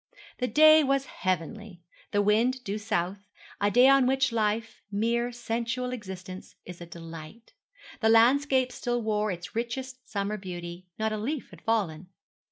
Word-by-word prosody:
The 250 Hz, -, 0 dB
day 310 Hz, +2 st, +7 dB
was 275 Hz, 0 st, +1 dB
heavenly; 185 Hz, -1 st, -4 dB, 0.3 s
the 205 Hz, 0 st, +1 dB
wind 235 Hz, +5 st, +2 dB
due 205 Hz, -1 st, -3 dB
south; 200 Hz, -3 st, -2 dB, 0.4 s
a 205 Hz, -, +3 dB
day 245 Hz, +5 st, +6 dB
on 275 Hz, -2 st, +5 dB
which 265 Hz, -1 st, +2 dB
life 225 Hz, 0 st, -1 dB
mere 235 Hz, +4 st, 0 dB
sensual 240 Hz, +1 st, -3 dB
existence 190 Hz, -4 st, -8 dB
is 175 Hz, -1 st, -10 dB
a 170 Hz, -, -8 dB
delight. 165 Hz, +5 st, -11 dB, 0.5 s
The 220 Hz, -, +3 dB
landscape 255 Hz, +3 st, +4 dB
still 240 Hz, -1 st, -2 dB
wore 215 Hz, -1 st, 0 dB
its 175 Hz, +2 st, -6 dB
richest 255 Hz, +2 st, -4 dB
summer 200 Hz, +1 st, -2 dB
beauty 175 Hz, -2 st, -7 dB
not 220 Hz, 0 st, -1 dB
a -, -, -2 dB
leaf 275 Hz, +6 st, -4 dB
had -, -, -14 dB
fallen. 185 Hz, -7 st, -1 dB
220 Hz, 155 wpm, -28 LUFS, 190-250 Hz, 0.5 s, day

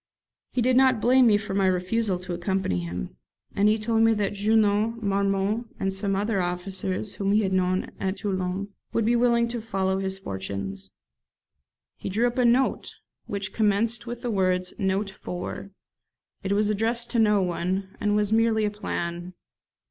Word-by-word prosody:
He 245 Hz, -, 0 dB
did 255 Hz, +1 st, +3 dB
not 260 Hz, -3 st, +5 dB
blame 250 Hz, +3 st, +5 dB
me 210 Hz, -2 st, +5 dB
for 205 Hz, -1 st, -5 dB
my 195 Hz, -1 st, +2 dB
refusal 185 Hz, +2 st, +1 dB
to 180 Hz, 0 st, -6 dB
accompany 175 Hz, -, -1 dB
him; 85 Hz, -8 st, -6 dB, 0.4 s
and 205 Hz, +1 st, +4 dB
he 215 Hz, -, +3 dB
told 225 Hz, +1 st, +1 dB
me 225 Hz, 0 st, +5 dB
that 205 Hz, -1 st, -1 dB
Junot, 215 Hz, +2 st, +2 dB
Marmont, 200 Hz, +3 st, 0 dB
and 195 Hz, 0 st, -1 dB
some 195 Hz, 0 st, -1 dB
other 205 Hz, +1 st, 0 dB
young -, -, +1 dB
officers 185 Hz, +2 st, -2 dB
whom 200 Hz, 0 st, 0 dB
he 215 Hz, +1 st, +3 dB
had 190 Hz, -1 st, -1 dB
known 185 Hz, 0 st, 0 dB
at 190 Hz, 0 st, -1 dB
Toulon, 190 Hz, 0 st, -2 dB, 0.2 s
would 230 Hz, -, +1 dB
be 235 Hz, +2 st, +3 dB
willing 235 Hz, -1 st, +3 dB
to 235 Hz, -1 st, -3 dB
follow 190 Hz, -3 st, -1 dB
his 190 Hz, 0 st, -2 dB
fortunes. 95 Hz, -, -6 dB, 1.1 s
He -, -, -5 dB
drew 220 Hz, +5 st, +1 dB
up 245 Hz, +1 st, -1 dB
a 250 Hz, -, +4 dB
note 250 Hz, +3 st, +2 dB, 0.3 s
which 195 Hz, -1 st, -3 dB
commenced 220 Hz, +2 st, +1 dB
with 240 Hz, 0 st, -6 dB
the 240 Hz, -, -1 dB
words 185 Hz, -2 st, 0 dB
'Note 195 Hz, 0 st, 0 dB
for.. 180 Hz, +1 st, -6 dB, 0.4 s
.' -, -, -48 dB
It 195 Hz, +1 st, 0 dB
was 210 Hz, +1 st, +2 dB
addressed 230 Hz, +3 st, -1 dB
to 235 Hz, -, +1 dB
no 210 Hz, -3 st, +4 dB
one, 185 Hz, +2 st, -2 dB
and 210 Hz, 0 st, +1 dB
was 210 Hz, 0 st, +1 dB
merely 225 Hz, -1 st, +3 dB
a 205 Hz, -, 0 dB
plan. 175 Hz, -3 st, -4 dB
200 Hz, 180 wpm, -25 LUFS, 190-225 Hz, 1.1 s, not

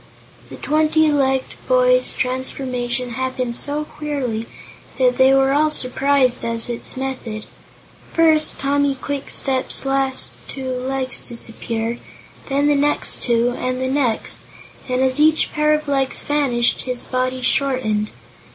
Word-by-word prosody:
The -, -, -9 dB
twenty 310 Hz, +1 st, +2 dB
legged 265 Hz, -2 st, 0 dB
boy's -, -, +4 dB
transformation 250 Hz, -1 st, -3 dB
happened 255 Hz, 0 st, -3 dB
so 290 Hz, +4 st, -1 dB
queerly 265 Hz, -8 st, -4 dB, 0.5 s
that 250 Hz, -2 st, +2 dB
they 260 Hz, 0 st, +6 dB
were 270 Hz, 0 st, +3 dB
all 305 Hz, +2 st, +3 dB
surprised 265 Hz, -2 st, +1 dB
at 230 Hz, +1 st, 0 dB
its 240 Hz, +2 st, -4 dB
method. 255 Hz, -5 st, -5 dB, 0.7 s
First, 315 Hz, -2 st, +4 dB
Tommy 280 Hz, 0 st, +1 dB
Kwikstep's 270 Hz, -1 st, -1 dB
last 270 Hz, -1 st, +1 dB
two 260 Hz, -1 st, -5 dB
legs 255 Hz, 0 st, -2 dB
disappeared; 230 Hz, 0 st, -4 dB, 0.5 s
then 280 Hz, +1 st, +1 dB
the 295 Hz, -, +4 dB
next 290 Hz, +1 st, +3 dB
two, 235 Hz, 0 st, +1 dB
and 255 Hz, +1 st, -3 dB
the 260 Hz, 0 st, -1 dB
next, 260 Hz, -5 st, 0 dB, 0.5 s
and 255 Hz, 0 st, 0 dB
as 260 Hz, +1 st, +3 dB
each 310 Hz, +1 st, +3 dB
pair 300 Hz, 0 st, +1 dB
of 305 Hz, 0 st, 0 dB
legs 270 Hz, -2 st, +1 dB
vanished 270 Hz, -5 st, +1 dB
his 250 Hz, -1 st, -4 dB
body 255 Hz, 0 st, -2 dB
shortened. 240 Hz, -8 st, +1 dB
265 Hz, 130 wpm, -20 LUFS, 250-285 Hz, 0.7 s, they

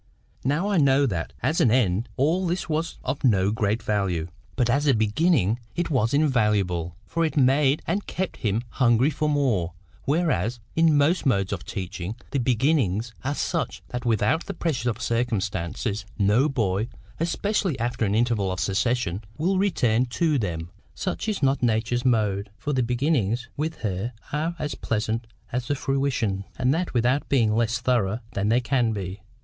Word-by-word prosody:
Now 150 Hz, +9 st, +1 dB
I 205 Hz, -2 st, +1 dB
know 140 Hz, -2 st, +4 dB
that, 90 Hz, -10 st, -2 dB
as 160 Hz, -, +2 dB
an 120 Hz, -, +5 dB
end, 115 Hz, -2 st, +2 dB
all 170 Hz, +7 st, +2 dB
this 175 Hz, +1 st, -2 dB
was 160 Hz, +1 st, -2 dB
of 140 Hz, -, -3 dB
no 100 Hz, -6 st, +3 dB
great 110 Hz, +1 st, 0 dB
value; 95 Hz, -6 st, 0 dB, 0.3 s
but 125 Hz, -3 st, +2 dB
as 140 Hz, +5 st, +2 dB
a 135 Hz, -, +5 dB
beginning, 110 Hz, -, +2 dB, 0.2 s
it 170 Hz, -1 st, -1 dB
was 120 Hz, -5 st, +2 dB
invaluable, 105 Hz, -, +1 dB
for 165 Hz, -, -1 dB
it 155 Hz, -1 st, -1 dB
made 135 Hz, +2 st, +3 dB
and 200 Hz, +1 st, -2 dB
KEPT 190 Hz, 0 st, -3 dB
him 110 Hz, +1 st, -1 dB
hungry 120 Hz, +4 st, +3 dB
for 150 Hz, +1 st, -1 dB
more; 120 Hz, -, +1 dB, 0.3 s
whereas, 135 Hz, -, +1 dB, 0.2 s
in 160 Hz, -2 st, +4 dB
most 150 Hz, +3 st, +2 dB
modes 100 Hz, -6 st, +1 dB
of -, -, -5 dB
teaching, 95 Hz, 0 st, -5 dB, 0.2 s
the 140 Hz, -, 0 dB
beginnings 120 Hz, -, +1 dB
are 145 Hz, +3 st, -1 dB
such -, -, -2 dB
that 125 Hz, 0 st, -4 dB
without 115 Hz, -, +1 dB
the -, -, -4 dB
pressure 125 Hz, -8 st, -1 dB
of 110 Hz, -, -3 dB
circumstances, 105 Hz, -3 st, -1 dB
no 105 Hz, +8 st, +3 dB
boy, 110 Hz, -5 st, 0 dB, 0.3 s
especially 170 Hz, -, 0 dB
after 120 Hz, 0 st, -1 dB
an 100 Hz, -1 st, +1 dB
interval 110 Hz, -5 st, +1 dB
of 95 Hz, -, -3 dB
cessation, 105 Hz, -1 st, 0 dB
will 185 Hz, +4 st, +1 dB
return 125 Hz, -, +2 dB
to 150 Hz, +3 st, +1 dB
them. 85 Hz, -5 st, -3 dB, 0.2 s
Such -, -, -3 dB
is 205 Hz, -8 st, -2 dB
not 135 Hz, 0 st, +2 dB
Nature's 120 Hz, +1 st, +1 dB
mode, 105 Hz, -5 st, +1 dB
for 145 Hz, -, -3 dB
the 130 Hz, -, +2 dB
beginnings 120 Hz, -2 st, 0 dB
with 160 Hz, +2 st, -3 dB
her 105 Hz, +3 st, -2 dB, 0.2 s
are 160 Hz, +3 st, -1 dB
as 150 Hz, -3 st, -3 dB
pleasant 110 Hz, +1 st, -2 dB, 0.2 s
as 125 Hz, 0 st, -2 dB
the 145 Hz, -, +1 dB
fruition, 130 Hz, -8 st, -1 dB
and 130 Hz, +1 st, +2 dB
that 170 Hz, -3 st, -2 dB
without 125 Hz, +4 st, +1 dB
being 115 Hz, -6 st, +3 dB
less 115 Hz, +1 st, +1 dB
thorough 120 Hz, -4 st, +1 dB
than 100 Hz, +1 st, -1 dB
they 120 Hz, +3 st, +3 dB
can 120 Hz, -2 st, +1 dB
be. 95 Hz, -1 st, -5 dB
120 Hz, 170 wpm, -25 LUFS, 105-145 Hz, 0.3 s, an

